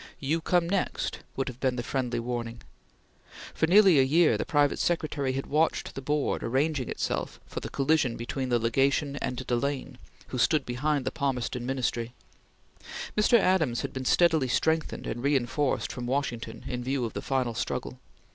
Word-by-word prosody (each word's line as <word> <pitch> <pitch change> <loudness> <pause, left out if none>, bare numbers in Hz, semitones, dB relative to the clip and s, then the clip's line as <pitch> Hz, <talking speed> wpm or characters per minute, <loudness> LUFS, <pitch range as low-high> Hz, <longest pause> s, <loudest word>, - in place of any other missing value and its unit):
"You 155 +4 0
come 175 0 +2
next!" 190 +1 -1 0.2
would 135 - -2
have 130 -2 -6
been 130 -2 +1
the 120 - -3
friendly 125 0 -1
warning. 120 -1 -4 0.9
For 160 - +1
nearly 190 -4 +7
a - - +6
year 155 +5 +4
the - - -2
private 145 -1 +2
secretary 150 -5 0
had 135 +1 -3
watched 155 +2 0
the 135 - -6
board 145 +2 0
arranging 135 +3 0
itself - - -3
for - - -6
the - - -6
collision 135 -3 +1
between 130 +2 -3
the 120 - +3
Legation 135 +5 +1
and 125 -2 -3
Delane 135 +3 -2 0.3
who 125 - -3
stood 150 +2 +3
behind 140 +3 -1
the - - -1
Palmerston 125 -3 -2
Ministry. 120 -3 -2 1.0
Mr. 215 +3 +5
Adams 175 - +2
had - - -5
been 130 -1 -5
steadily 160 -3 +4
strengthened 160 +5 0
and 120 - -4
reenforced 140 0 0
from 120 -1 -5
Washington 130 -3 -3
in 125 -1 -3
view 130 -1 -1
of 115 - -5
the - - -4
final 130 -3 -1
struggle. 125 +2 -4
135 Hz, 170 wpm, -28 LUFS, 125-150 Hz, 1.0 s, nearly